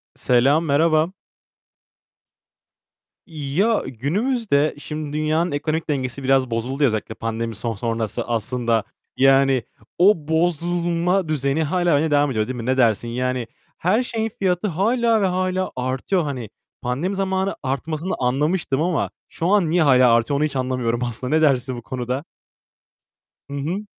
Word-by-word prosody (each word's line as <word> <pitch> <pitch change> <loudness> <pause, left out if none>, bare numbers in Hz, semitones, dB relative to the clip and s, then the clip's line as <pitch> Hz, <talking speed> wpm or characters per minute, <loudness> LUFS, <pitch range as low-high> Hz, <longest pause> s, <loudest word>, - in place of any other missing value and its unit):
Selam, 135 +6 +3
merhaba. 155 +3 +2 2.1
Ya, 165 +8 0
günümüzde, 155 - 0
şimdi, 150 0 -6
dünyanın 155 +3 +1
ekonomik 155 +2 -2
dengesi 135 -1 -2
biraz 130 -1 +2
bozuldu 125 +5 -1
ya, 140 - +6
özellikle 110 0 -3
pandemi 115 0 -3
son 115 +2 -3
sonrası 115 +1 -3
aslında. 115 -1 0 0.3
Yani, 135 -1 +4 0.3
o 175 -4 +4
bozulma 175 +2 +1
düzeni 145 0 0
hâlâ 175 +2 +1
aynı 150 +2 +2
devam 145 -1 +3
ediyor, 110 -3 -1
değil 130 - -4
mi? 115 -2 -5
Ne 130 +1 +1
dersin? 120 -2 +2
Yani 125 0 -2 0.3
her 210 +8 +2
şeyin 225 -2 -2
fiyatı 185 +1 +1
hâlâ 225 +5 +2
ve 195 - +3
hâlâ 185 0 -1
artıyor. 130 +8 -1
Hani 130 -7 -4 0.3
pandemi 145 +11 -2
zamanı 190 0 -1
artmasını 155 +6 -2
anlamıştım 140 +3 0
ama 175 +1 0 0.2
şu 165 - -3
an 195 -4 +3
niye 175 +2 +2
hâlâ 130 -4 +5
artıyor 115 +5 +2
onu - - +2
hiç 150 - -4
anlamıyorum 125 -2 -1
aslında. 125 +4 -2
Ne 160 - +3
dersin 130 -4 +2
bu - - -7
konuda? 125 +4 -4 1.2
Hı - - -7
hı. 175 +9 -3
145 Hz, 145 wpm, -22 LUFS, 125-175 Hz, 2.1 s, ya